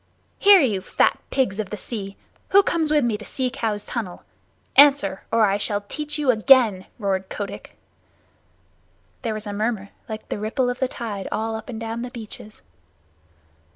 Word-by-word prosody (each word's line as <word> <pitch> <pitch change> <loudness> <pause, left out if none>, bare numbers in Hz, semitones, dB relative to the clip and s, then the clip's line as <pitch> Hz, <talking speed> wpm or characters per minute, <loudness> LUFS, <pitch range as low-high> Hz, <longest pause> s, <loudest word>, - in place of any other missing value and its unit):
"Hear 400 -1 +8
you, 215 -9 +1
fat - - +1
pigs 230 -7 0
of 210 -3 -3
the 210 - -5
sea. 200 -2 -6 0.3
Who 400 +1 +6
comes 325 -5 0
with 300 -2 +3
me 225 -3 0
to - - -9
the - - -11
Sea 255 -2 -1
Cow's 210 -3 -2
tunnel? 210 -7 -5 0.5
Answer, 275 -9 +5
or 225 -1 +4
I 200 0 +1
shall 205 0 0
teach 300 +8 -4
you 290 -4 +3
again," 220 -5 +4
roared 195 -4 -2
Kotick. 205 -1 -7 1.4
There 225 -4 -2
was 215 0 -6
a 205 - -4
murmur 210 -1 -2 0.2
like 220 0 -6
the - - -3
ripple 245 +4 0
of 245 - -7
the 260 - +1
tide 215 -6 -5
all 225 0 -2
up 220 +2 -8
and 225 -3 -5
down 230 +1 -4
the 245 - -5
beaches. 215 -2 -10
220 Hz, 180 wpm, -23 LUFS, 205-255 Hz, 1.4 s, Hear